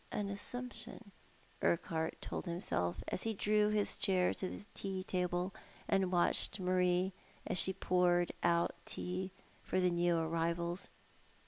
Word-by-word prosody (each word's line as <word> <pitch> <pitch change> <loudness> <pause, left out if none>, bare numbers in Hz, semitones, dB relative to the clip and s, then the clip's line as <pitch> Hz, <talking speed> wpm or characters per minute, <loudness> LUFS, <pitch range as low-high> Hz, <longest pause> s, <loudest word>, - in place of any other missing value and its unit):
65 210 - -2
an 200 - -3
assumption, 235 -1 -5 0.5
Urquhart 160 -1 0
told - - -4
himself, 90 - -1
as - - 0
he 225 -1 +1
drew 210 +1 +3
his 210 -1 +2
chair 185 -2 +3
to 185 - -3
the - - -8
tea 190 -1 -3
table 180 0 -1 0.3
and 190 -2 +2
watched 180 +2 +2
Marie 180 0 +2 0.3
while - - -1
she 190 - +3
poured 180 -2 +2
out 170 0 +3
tea 185 +1 -2 0.3
for 185 - 0
the 180 -1 +3
new 175 0 +2
arrivals. 170 +2 -1
180 Hz, 140 wpm, -36 LUFS, 175-195 Hz, 0.5 s, drew